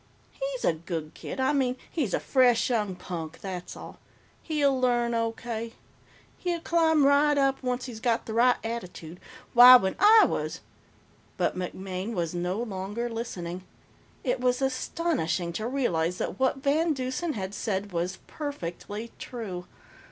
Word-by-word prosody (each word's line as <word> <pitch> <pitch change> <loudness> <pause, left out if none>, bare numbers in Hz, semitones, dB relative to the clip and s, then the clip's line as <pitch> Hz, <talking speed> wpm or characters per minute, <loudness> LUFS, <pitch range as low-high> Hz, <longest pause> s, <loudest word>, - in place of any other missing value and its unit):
"He's - - -4
a - - +4
good 160 -1 -5
kid. - - -7
I 260 +2 +2
mean, 260 -3 +1
he's 275 - 0
a - - -1
fresh 250 -2 +3
young 210 -5 0
punk, 165 -3 -6
that's 185 -2 -6
all. - - -10 0.4
He'll 285 -5 +1
learn, 240 -1 +2
O.K. 230 0 -3 0.7
He'll 350 -1 -1
climb 320 -3 +3
right 290 +1 +4
up, 270 -1 +2
once 250 -1 -2
he's 240 -4 -7
got 230 0 0
the 220 - -5
right 245 +2 +5
attitude. 180 -7 -6 0.3
Why, 250 +1 +11
when 190 -6 +3
I 430 +2 +8
was - - -3 0.4
" - - -33
But - - 0
MacMaine 185 +3 -4
was 170 -4 -2
no 180 +2 -2
longer 210 +3 -4
listening. 185 -6 -5 0.6
It 250 0 0
was 250 0 +2
astonishing 260 - -1
to 215 +6 -3
realize 180 -10 0
that 185 - -4
what 265 0 +1
VanDeusen 295 0 0
had 190 -1 -4
said 205 -1 -2
was 175 +2 -2
perfectly 230 - -6
true. 190 -8 -6
235 Hz, 150 wpm, -27 LUFS, 185-270 Hz, 0.7 s, Why